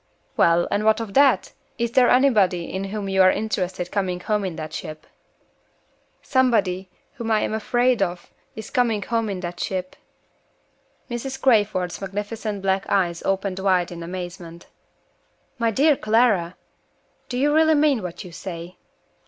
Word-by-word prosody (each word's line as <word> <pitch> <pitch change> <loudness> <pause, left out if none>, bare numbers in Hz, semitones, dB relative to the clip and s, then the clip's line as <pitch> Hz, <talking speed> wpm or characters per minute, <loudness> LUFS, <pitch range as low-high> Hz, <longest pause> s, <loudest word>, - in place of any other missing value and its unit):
"Well, 170 +1 +3
and 205 - 0
what 220 +1 +3
of 220 -3 -6
that? 275 +2 +3 0.2
Is 235 -1 -1
there 250 0 +4
anybody 205 -10 +3
in 190 +1 -3
whom 200 0 -4
you 190 0 +2
are 185 - +7
interested 185 -4 -2
coming 185 -3 -1
home 210 +2 -1
in 185 -4 -4
the 155 -1 -5
ship?" 155 0 -8 1.2
"Somebody 205 -8 +1 0.2
whom 230 -2 -5
I 215 -1 +3
am - - -2
afraid 240 +2 +1
of 175 -2 -3 0.2
is 220 - -8
coming 235 -6 +1
home 230 -2 -1
in 190 -2 -4
the 175 -1 -4
ship." 185 +1 -4 1.1
Mrs. 260 +3 -5
Crayford's 205 -9 +1
magnificent 205 +1 -4
black 190 0 0
eyes 175 -3 +1
opened 195 -1 -1
wide 185 -3 +1
in 170 -1 -7
amazement. 175 -1 -7 0.9
"My 230 -1 +2
dear 285 +7 +3
Clara! 215 -7 +2 0.7
do 245 - -3
you 290 +3 +2
really 315 0 +4
mean 290 -5 +3
what 180 +2 -6
you 180 - -11
say?" 170 +1 -8
200 Hz, 155 wpm, -23 LUFS, 180-230 Hz, 1.2 s, are